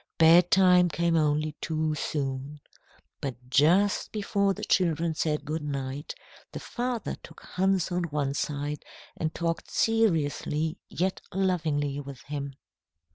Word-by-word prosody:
Bedtime 180 +2 +6
came 170 +1 +1
only 155 -1 +1
too 155 -1 -1
soon. 140 -1 -3 0.6
But 135 -3 -3 0.2
just 180 +9 +3
before 200 -2 0
the - - -8
children 170 -3 +2
said 150 -2 -1
good 155 +2 -3
night, 140 -1 -4 0.4
the - - -4
father 245 -1 -3
took - - -14
Hans 190 -1 0
one 150 -6 -1
side 145 +1 -3 0.3
and 155 -1 -2
talked 165 0 -3
seriously 160 -6 +1
yet 185 +2 -1
lovingly 155 -7 0
with 140 -2 -8
him. 140 -1 -5
160 Hz, 120 wpm, -28 LUFS, 145-180 Hz, 0.6 s, Bedtime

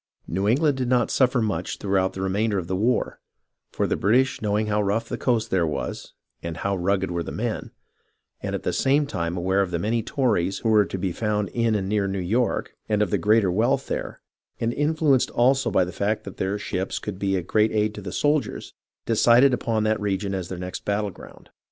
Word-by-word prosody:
New 95 +4 -1
England 140 +5 +3
did 130 -2 -1
not 125 -1 +2
suffer 125 -2 +3
much 95 -5 -2
throughout 95 -2 0
the 95 - -4
remainder 100 +2 0
of 90 - -2
the 95 - -2
war, 115 +6 0 0.5
for - - 0
the - - 0
British 130 +6 +2
knowing 105 0 0
how 105 0 +1
rough 105 +3 0
the - - -3
coast 120 -4 0
there 90 -3 +2
was, 75 - -5 0.3
and 85 -1 -5
how 100 +3 -1
rugged 95 0 0
were 85 0 -1
the - - -5
men, - - -3 0.7
and - - -3
at - - -5
the - - -1
same 145 +2 +2
time 85 - -3
aware 95 +3 +1
of 95 - -1
the 85 - -1
many 110 +6 0
Tories 105 -7 0
who 115 - -1
were 105 -2 +5
to 95 +2 -5
be 95 0 -2
found 105 +1 -1
in 115 -2 +1
and 95 -2 -1
near 100 -1 +1
New 95 0 -2
York, 110 +7 -1
and 105 -1 +2
of 100 - -3
the - - +1
greater 105 -3 +3
wealth 120 +8 +1
there, - - -4 0.4
and 115 +1 0
influenced 150 -2 +2
also 130 +2 +2
by 95 - +3
the 90 - -6
fact 105 +4 -1
that 100 - -9
their 95 +2 -1
ships 95 -2 -3
could 100 -3 -6
be 95 -1 0
a 90 - -1
great 110 +4 +2
aid 105 0 +1
to 105 - -8
the 95 -2 -6
soldiers, 145 +5 -1 0.3
de 115 - 0
cided 120 +4 +5
upon 115 -3 0
that 110 0 +1
region 100 -1 -1
as 95 -2 -4
their 95 - -5
next 90 0 -6
battle 100 0 -1
ground. - - -15
105 Hz, 225 wpm, -24 LUFS, 95-115 Hz, 0.7 s, were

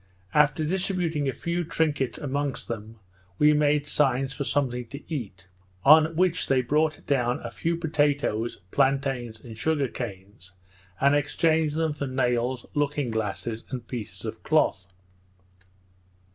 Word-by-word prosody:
After 150 +1 +3
distributing 175 -4 0
a - - +1
few 170 +5 -2
trinkets 150 -6 0
amongst 140 -1 -3
them, 110 -1 -6 0.4
we 150 0 +5
made 150 -1 +2
signs 135 -2 +1
for 140 - -3
something 125 -4 -1
to 140 +6 -9
eat, 95 - -6 0.4
on 155 +2 +7
which 180 0 +2
they 130 -1 +3
brought 155 +4 0
down 125 -4 +1
a - - -5
few 170 +1 -1
potatoes, 145 -8 0
plantains, 135 -4 0
and 115 -1 -10
sugar 145 +3 0
canes, 95 -3 -8 0.5
and 140 +1 +4
exchanged 155 +1 +2
them 160 -1 0
for 145 -1 -4
nails, 125 -1 0
looking 145 -3 0
glasses, 110 +1 -3
and 125 -3 -6
pieces 120 -5 -6
of - - -5
cloth. 90 -1 +1
140 Hz, 135 wpm, -26 LUFS, 120-150 Hz, 0.5 s, on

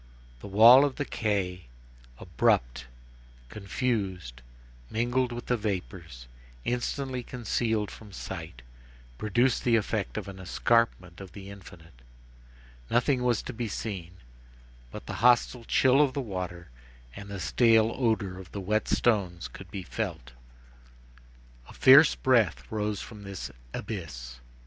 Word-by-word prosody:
The - - -9
wall 115 +7 +8
of 145 -2 0
the 145 - -3
quay, 95 -7 -2 0.5
abrupt, - - 0 0.6
confused, 95 - -3 0.5
mingled 120 +2 0
with 120 0 -6
the 125 - +1
vapors, 90 - -5 0.4
instantly 125 +1 -2
concealed 115 -3 -2
from 105 -2 -12
sight, 65 -8 -8 0.6
produced 120 +4 +1
the 120 -2 +3
effect 100 - -1
of - - -4
an 95 -1 -9
escarpment 95 -2 0
of 95 -3 -11
the 100 0 -9
infinite. 85 -8 -14 0.9
Nothing 125 +2 +2
was 120 -3 +1
to 130 - -6
be 115 0 -3
seen, 95 -4 -6 0.7
but - - -9
the - - -6
hostile 120 0 +3
chill 130 +4 +4
of 140 -3 +2
the - - -3
water 90 - -6 0.4
and 100 - -9
the 100 -1 -6
stale 115 +5 +3
odor 110 -7 -1
of 95 -3 -13
the 100 - -4
wet 105 +3 -1
stones 90 - 0
could - - -12
be 95 - -6
felt. 65 -7 -5 1.4
A - - -12
fierce 135 +4 +7
breath 115 -10 +2
rose 105 -2 -2
from 110 -2 -11
this 100 -2 -7 0.2
abyss. 60 - -7
105 Hz, 130 wpm, -28 LUFS, 90-120 Hz, 1.4 s, wall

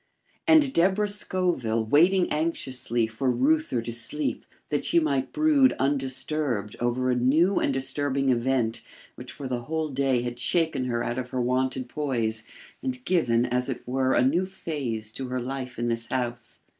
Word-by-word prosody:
and 310 -4 +5
Deborah 190 +4 +3
Scoville 175 - 0
waiting 175 - +4
anxiously 130 -7 0
for 115 +4 -2
Reuther 275 - +1
to 115 - -5
sleep, 120 +6 -3 0.2
that 145 - -1
she 170 - +3
might 140 -4 0
brood 300 -4 +4
undisturbed 135 -4 -1
over 125 +1 0
a - - +2
new 155 +10 +3
and - - +1
disturbing 135 0 0
event 120 -2 +1 0.3
which - - -9
for 140 - -7
the 120 -2 -3
whole 160 0 -2
day 135 -3 +1
had 120 0 -5
shaken 160 +1 +1
her 120 -2 -1
out 120 +2 -2
of 125 0 -5
her 130 - -3
wonted 130 +1 0
poise, 120 -6 -2 0.4
and 255 -1 -4
given, 120 -10 +2
as 125 +2 -1
it 130 - -5
were, 130 +1 +1
a 125 - +4
new 165 +8 +2
phase 135 - -4
to 130 +3 -5
her 125 0 -2
life 130 0 -5
in 120 - -2
this 115 0 -2
house. 120 -2 -4
130 Hz, 170 wpm, -26 LUFS, 120-160 Hz, 0.4 s, and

